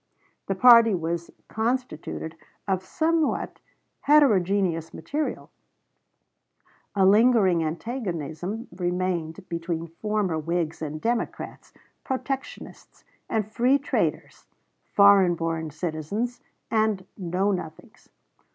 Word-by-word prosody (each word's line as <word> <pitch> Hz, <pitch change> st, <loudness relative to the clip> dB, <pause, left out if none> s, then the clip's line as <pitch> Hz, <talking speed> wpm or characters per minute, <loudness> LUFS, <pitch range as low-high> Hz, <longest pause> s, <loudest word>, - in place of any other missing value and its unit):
The 195 Hz, -, -1 dB
party 230 Hz, 0 st, +7 dB
was 170 Hz, 0 st, -3 dB, 0.2 s
constituted 220 Hz, -9 st, -3 dB, 0.3 s
of 190 Hz, -1 st, 0 dB
somewhat 320 Hz, -, 0 dB, 0.4 s
heterogeneous 195 Hz, -, +3 dB
material; 295 Hz, -, -4 dB, 1.4 s
a 195 Hz, -2 st, +4 dB
lingering 205 Hz, -4 st, +5 dB
antagonism 175 Hz, -, -4 dB
remained 180 Hz, -1 st, -2 dB
between 170 Hz, -1 st, -3 dB, 0.2 s
former 210 Hz, -6 st, 0 dB
Whigs 165 Hz, 0 st, -2 dB
and 155 Hz, 0 st, -4 dB
Democrats, 235 Hz, +6 st, -3 dB, 0.3 s
protectionists 270 Hz, +1 st, -6 dB, 0.3 s
and 220 Hz, -2 st, 0 dB
free 250 Hz, +5 st, +3 dB
traders, 280 Hz, -, -2 dB, 0.4 s
foreign 200 Hz, -3 st, +6 dB
born 165 Hz, -1 st, -2 dB
citizens 170 Hz, -, -4 dB, 0.3 s
and 215 Hz, -4 st, +1 dB
Know 190 Hz, +2 st, 0 dB
Nothings. 185 Hz, +5 st, -7 dB
190 Hz, 85 wpm, -25 LUFS, 165-230 Hz, 1.4 s, party